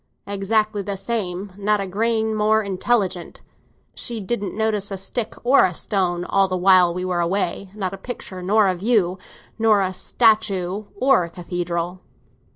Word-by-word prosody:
"Exactly 205 +1 0
the 200 0 -4
same; 195 -3 -3
not 210 +1 +1
a 195 - -2
grain 220 +3 0
more 215 +1 +2
intelligent. 195 -2 -1 0.5
She 235 -2 -4
didn't 205 0 -3
notice 215 -2 0
a 195 - -4
stick 215 +4 -3
or 260 +3 +5
a 180 -2 +1
stone 180 -3 -1
all 195 +1 +2
the 185 -1 -2
while 180 -1 +5
we 180 +1 -4
were 180 -1 -1
away—not 190 +2 -2
a - - -6
picture 195 -3 -7
nor 205 +3 +3
a 185 - +2
view, 190 -2 +1 0.4
not 220 -2 +4
a 185 - -6
statue 205 -2 +1
nor 255 -8 +4
a - - -9
cathedral." 175 0 -4
195 Hz, 160 wpm, -22 LUFS, 185-215 Hz, 0.5 s, or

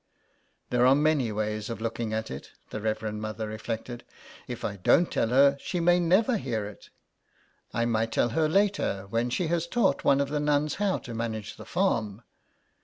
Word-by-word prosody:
''There 125 0 +4
are 135 - +6
many 145 -5 +2
ways 105 +1 -2
of 115 - -4
looking 115 0 -3
at 110 0 -3
it," 65 - -8 0.2
the 110 - -4
Reverend 110 0 -2
Mother 110 0 -4
reflected. 115 +2 -5 0.2
'' - - -19
If - - -5
I 100 - -3
don't 170 - +3
tell - - +1
her, 140 +3 +5
she 180 - -3
may 175 +1 +4
never 195 +8 +3
hear 115 - -2
it. 105 0 -11 0.8
I 115 - 0
might 115 -1 0
tell 120 - +2
her 155 +6 +1
later, 195 - +1
when 115 +2 0
she 170 +8 -1
has 170 0 0
taught 190 -6 +1
one 140 - +4
of 140 -1 0
the 150 0 -1
nuns 150 0 +1
how 200 -2 +2
to 120 - -8
manage 110 -2 -4
the - - -11
farm." 105 0 -1
120 Hz, 190 wpm, -27 LUFS, 110-155 Hz, 0.8 s, are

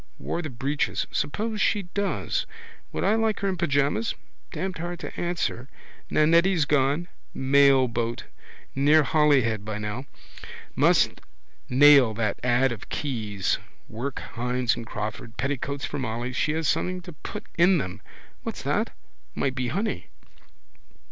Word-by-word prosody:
Wore 170 - -3
the 155 - -5
breeches. 135 +4 -1
Suppose 210 +9 -2
she 205 - +2
does? 200 +3 -2 0.4
Would - - -2
I 200 - +3
like 225 -1 +1
her 200 - 0
in 190 - -1
pyjamas? 140 - +1 0.4
Damned 185 -2 -4
hard 175 +1 -4
to - - -7
answer. 170 -7 -2 0.4
Nannetti's 165 +2 +4
gone. 145 +3 +2 0.3
Mailboat. 130 -4 +3 0.5
Near 150 +3 +5
Holyhead 135 -7 +3
by 110 0 -4
now. 105 +5 -4 0.7
Must - - +3 0.5
nail 135 -4 +7
that 110 -2 -1
ad 125 +1 +3
of 115 -3 -7
Keyes's. 105 -9 -1 0.3
Work 125 +4 -5
Hynes 125 +1 0
and 115 - -7
Crawford. 110 +1 -5
Petticoats 140 +2 -2
for - - -4
Molly. 120 0 -3
She 150 +4 +1
has 160 -1 -1
something 180 +4 0
to 175 - -9
put 150 - -8
in 175 +2 +5
them. 95 - -4 0.4
What's - - -5
that? - - -1 0.4
Might 135 - 0
be 130 -2 -2
money. 180 - -2
140 Hz, 135 wpm, -26 LUFS, 120-165 Hz, 0.7 s, nail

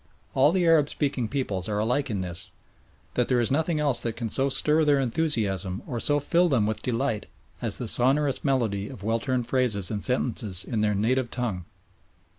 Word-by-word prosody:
All 135 +3 +4
the 180 -1 +1
Arab 160 -3 +4
speaking 135 -5 -2
peoples 105 -7 -2
are 105 - -2
alike 125 +6 0
in 100 -4 -2
this 90 0 -5 0.6
that 125 - 0
there 125 -2 +1
is 120 - +1
nothing 160 +2 0
else 145 -4 +1
that 115 -2 -3
can 115 -2 -4
so 135 +5 0
stir 150 +3 +3
their 145 -2 +3
enthusiasm 110 - -1
or 120 - -4
so 145 +5 +1
fill 170 +5 +2
them 120 -8 +2
with 110 0 -2
delight 125 -2 -2 0.3
as - - +2
the - - -4
sonorous 135 +2 +4
melody 110 -8 -1
of 100 - -11
well 115 +2 0
turned 130 -1 -2
phrases 115 -7 0
and 105 -2 -4
sentences 115 -7 +1
in 115 -4 -3
their 105 -1 +1
native 120 +5 0
tongue. 110 -10 -4
125 Hz, 195 wpm, -25 LUFS, 105-140 Hz, 0.6 s, All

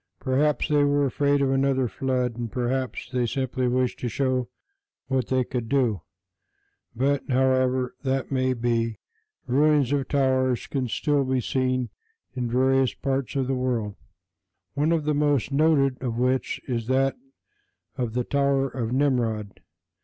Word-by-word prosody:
Perhaps 145 +1 +1
they 145 -1 +4
were 145 0 +2
afraid 140 +1 +1
of 135 - +1
another 135 -1 +2
flood, 125 +1 -1
and 120 -2 -5
perhaps 130 +1 -2
they 125 -1 +1
simply 130 0 -1
wished 125 0 0
to 125 - -2
show 130 0 -1 0.6
what 130 -3 0
they 130 -1 +1
could 120 -2 -4
do; 120 - +1 0.9
but 135 +3 +1
however 130 -1 +2
that 135 0 -1
may 130 -1 +1
be, 115 -1 -1 0.5
ruins 145 0 +3
of 140 -2 0
towers 130 -3 +1
can 130 -3 -2
still 145 +4 +1
be 130 0 0
seen 130 0 -1 0.4
in 125 -2 -3
various 130 +1 +2
parts 135 -1 -2
of 135 -1 +1
the 135 - -1
world, 120 -5 -1 0.8
one 150 +3 +1
of 165 -2 +1
the 150 - +1
most 145 -3 +1
noted 140 -3 +2
of 120 -3 -3
which 125 +1 0
is 115 -4 -2
that 135 +1 +2 0.8
of 120 -5 -3
the 125 0 0
"Tower 140 0 +1
of 120 -3 -4
Nimrod." 120 -6 0
130 Hz, 150 wpm, -25 LUFS, 125-140 Hz, 0.9 s, they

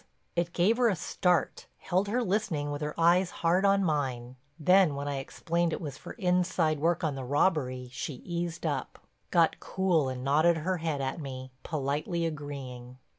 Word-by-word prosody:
It 175 0 0
gave 200 +7 +3
her 245 -2 +4
a 200 - +1
start—held 180 +2 0
her 240 +4 0
listening 185 -8 -1
with 145 +1 -4
her 150 +2 -4
eyes 175 +2 +4 0.2
hard 180 +4 +4
on 195 0 +4
mine—then 145 +4 +1
when 140 +1 -4
I 140 -1 -2
explained 170 +4 -1
it - - -2
was 145 -4 -6
for - - -8
inside 180 -5 +1
work 170 +3 +1
on 155 -3 +1
the 135 -1 -5
robbery 130 -2 +1
she 130 +2 -4
eased 170 +4 -4
up, 145 -4 -3 0.2
got 170 -2 +3
cool 175 -7 +1
and 130 -1 -5
nodded 155 +5 +4
her 180 +4 -1
head 160 -4 -2
at 135 +5 -3
me, 130 -2 -7
politely 155 +4 -2
agreeing. 135 -5 -6
160 Hz, 170 wpm, -29 LUFS, 140-180 Hz, 0.2 s, her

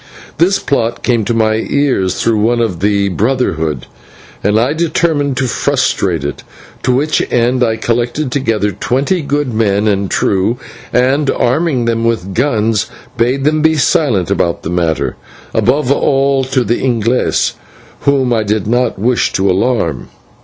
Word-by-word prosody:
This 185 +4 +3
plot 120 -4 -1
came 120 -4 +1
to 120 - 0
my 110 -1 +2
ears 115 -7 0
through 115 -2 +2
one 120 +3 +2
of 110 -8 -1
the 100 0 +1
Brotherhood, 85 - -1 0.6
and 105 +2 +2
I 125 +5 +1
determined 155 -4 0
to 130 - 0
frustrate 105 - 0
it, 70 - -4 0.4
to 130 - +1
which 145 +5 +1
end 125 +1 +2
I 115 -2 +1
collected 120 +5 -1
together 115 -6 0
twenty 140 - -1
good 145 -3 -1
men 105 -1 +1
and 100 -2 0
true, 100 +5 +1 0.3
and, 135 +3 +2
arming 130 -1 +1
them 115 -1 0
with 100 -5 -1
guns, 115 -4 0 0.3
bade 125 +3 0
them 155 +1 +2
be 160 0 +3
silent 135 - +1
about 85 -1 0
the 80 - -4
matter, 85 -3 -1 0.4
above 135 +1 +1
all 135 -1 +2
to 130 -1 0
the 120 +2 -1
/Inglese/, 120 -1 +1 0.5
whom 135 -3 +1
I 115 - +1
did 105 -1 -1
not 120 +2 0
wish 120 +5 +1
to 95 - +1
alarm. 95 - 0
120 Hz, 155 wpm, -14 LUFS, 105-135 Hz, 0.6 s, This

